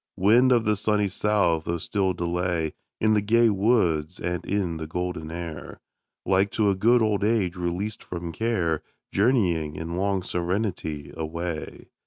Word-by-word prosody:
Wind 120 Hz, +7 st, +5 dB
of 120 Hz, -2 st, +4 dB
the 105 Hz, 0 st, +3 dB
sunny 105 Hz, 0 st, +1 dB
south! 100 Hz, -5 st, +1 dB
oh 85 Hz, -, 0 dB
still 95 Hz, +2 st, 0 dB
delay 85 Hz, -2 st, -1 dB, 0.3 s
In 110 Hz, 0 st, +3 dB
the 105 Hz, -, +3 dB
gay 115 Hz, +2 st, +4 dB
woods 90 Hz, -7 st, +1 dB
and 90 Hz, -1 st, -2 dB
in 95 Hz, -5 st, -1 dB
the 80 Hz, -1 st, -5 dB
golden 90 Hz, -1 st, -4 dB
air, 85 Hz, -2 st, -7 dB, 0.5 s
Like 95 Hz, +1 st, +3 dB
to 105 Hz, -2 st, +3 dB
a -, -, 0 dB
good 115 Hz, +5 st, +4 dB
old 105 Hz, -2 st, +1 dB
age 105 Hz, -5 st, +1 dB
released 90 Hz, +4 st, -3 dB
from 85 Hz, -1 st, -5 dB
care, 90 Hz, -7 st, 0 dB, 0.3 s
Journeying, 90 Hz, -, +2 dB
in 85 Hz, +2 st, -4 dB
long 95 Hz, -1 st, 0 dB
serenity, 90 Hz, -5 st, -2 dB
away. 80 Hz, 0 st, -5 dB
90 Hz, 155 wpm, -25 LUFS, 85-105 Hz, 0.5 s, Wind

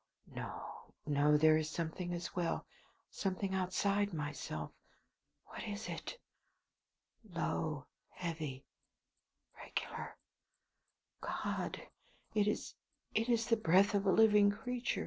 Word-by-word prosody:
No, -, -, -7 dB
no! 150 Hz, 0 st, +4 dB
There 155 Hz, +1 st, +6 dB
is 155 Hz, -1 st, -1 dB
something 170 Hz, +2 st, -3 dB
as 175 Hz, 0 st, -4 dB
well, 175 Hz, -2 st, 0 dB, 0.5 s
something 190 Hz, 0 st, -1 dB
outside 195 Hz, +1 st, +1 dB
myself. 145 Hz, -, -4 dB, 0.7 s
What -, -, -8 dB
is 205 Hz, 0 st, -4 dB
it? -, -, -5 dB, 1.2 s
Low; 155 Hz, -3 st, -1 dB, 0.2 s
heavy; 155 Hz, -6 st, -4 dB, 0.9 s
regular. -, -, -5 dB, 1.0 s
God! -, -, -2 dB, 0.5 s
it 210 Hz, -1 st, +3 dB
is 210 Hz, -, -1 dB, 0.4 s
it 225 Hz, +3 st, +1 dB
is 230 Hz, -2 st, +3 dB
the 230 Hz, -, +4 dB
breath 200 Hz, +1 st, +5 dB
of 200 Hz, -1 st, +2 dB
a -, -, +6 dB
living 210 Hz, -1 st, +7 dB
creature! 245 Hz, +4 st, -1 dB
185 Hz, 110 wpm, -36 LUFS, 155-205 Hz, 1.2 s, living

